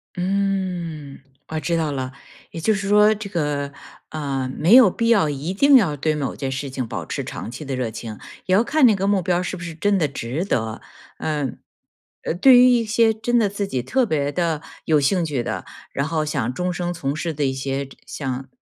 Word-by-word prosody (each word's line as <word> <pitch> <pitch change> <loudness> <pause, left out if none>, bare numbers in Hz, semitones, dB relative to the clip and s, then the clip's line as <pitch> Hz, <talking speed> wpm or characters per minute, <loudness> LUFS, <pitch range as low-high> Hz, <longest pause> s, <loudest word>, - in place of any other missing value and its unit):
嗯， 180 -6 -2 0.3
我 155 - -2
知 165 +3 -1
道 160 -2 0
了。 130 -2 -4 0.4
也 - - -6
就 220 - +3
是 195 -1 -3
说 210 +1 +5
这 210 -1 -7
个， 145 -5 -2 0.4
呃， 135 -4 -3
没 170 +8 +3
有 250 -6 +9
必 230 +5 -1
要 205 -10 +4
一 145 +5 -3
定 280 +8 +5
要 190 - +4
对 155 +2 0
某 145 -2 -3
件 135 -2 -3
事 135 +1 -4
情 130 -2 -4
保 - - -5
持 - - -4
长 110 - -6
期 130 +5 -7
的 135 -1 -3
热 125 -3 -2
情， 110 -1 -7 0.3
也 185 - +3
要 215 - +4
看 280 +3 +3
那 225 -4 +6
个 195 0 -1
目 200 -2 +2
标 180 0 0
是 - - -4
不 175 - -8
是 170 -2 -6
真 200 +5 +1
的 160 -5 +2
值 140 +5 -4
得。 110 - -2 0.4
嗯。 150 -4 -3 0.6
呃， - - -1
对 250 +9 +7
于 250 +1 +8
一 245 -2 +4
些 225 +1 +3
真 235 +2 +1
的 220 - +3
自 200 0 -3
己 130 -9 -2
特 255 - +1
别 145 -7 -1
地 165 -4 0 0.2
有 155 -2 +3
兴 170 +6 +2
趣 145 -6 -1
的， - - -4 0.3
然 140 - -1
后 155 -1 -1
想 130 -5 -2
终 180 +4 -2
生 175 0 -2
从 140 -4 -3
事 160 +1 -3
的 145 -1 -1
一 135 - 0
些 135 +1 -3
这 135 - -15
像 135 -1 -5
160 Hz, 240 characters per minute, -22 LUFS, 140-200 Hz, 0.6 s, 有